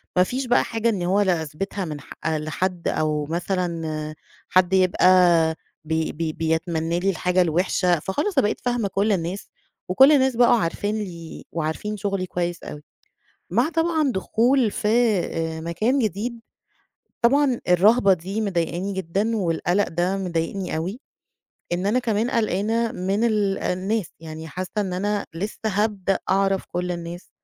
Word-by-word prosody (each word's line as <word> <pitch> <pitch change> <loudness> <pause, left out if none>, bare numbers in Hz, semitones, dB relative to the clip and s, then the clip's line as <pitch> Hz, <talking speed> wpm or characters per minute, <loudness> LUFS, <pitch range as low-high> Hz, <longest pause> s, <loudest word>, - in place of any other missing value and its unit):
ما 180 - +6
فيش 255 +6 -3
بقى 245 - +4
حاجة 230 0 -1
إن 190 -5 -1
هو 195 +3 +2
لأثبِتها 180 +2 -1
من 150 -3 -5
ح - - -11
لحد 160 +3 -2
أو 150 -1 0
مثلًا 165 -2 -3 0.3
حد 185 0 +3
يبقى 185 -1 +3 0.8
ب 160 - -2 0.2
ب 160 -2 -3
بيتمنّى 165 +1 0
لي 195 +2 +1
الحاجة 180 0 +1
الوِحشة، 175 0 +2
فخلاص 295 - -2
أنا - - +5
بقيت - - -3
فاهمة 240 -4 0
كل 200 +3 0
الناس 180 +1 -2 0.4
وكل 265 +10 +7
الناس 265 -3 +3
بقوا 240 0 +5
عارفين 205 +2 -1
لي 170 -6 -7
وعارفين 170 +6 -3
شُغلي 195 -2 -2
كويس 175 -1 -3
أوي. 150 0 -8 0.7
مع 240 - +2
طبعًا 325 -4 +1
دخول 230 +4 +2
في 210 - -2
آآ 175 -8 +1
مكان 215 +12 0
جديد، 230 +2 -2 0.8
طبعًا 265 +1 +3
الرَهبة 200 +4 +5
دي 190 +5 -2
مضايقاني 185 -1 -1
جدًا 195 +5 -1
والقَلَق 175 +1 0
ده 175 +3 0
مضايقني 180 -1 -2
أوي، 185 +10 -4 0.7
إن 180 +3 -1
أنا 230 +5 +2
كمان 230 0 0
قلقانة 225 +1 0
من 195 +5 -1
ال 210 -4 +1
الناس، 195 +2 -1
يعني 160 0 -8
حاسّة 185 +4 -5
إن 195 -3 -1
أنا 205 +2 -1
لسّه 200 +6 -4
هابدأ 205 -2 0
أعرف 195 0 +2
كل 180 0 -1
الناس، 170 +1 -7
190 Hz, 145 wpm, -23 LUFS, 170-215 Hz, 0.8 s, وكل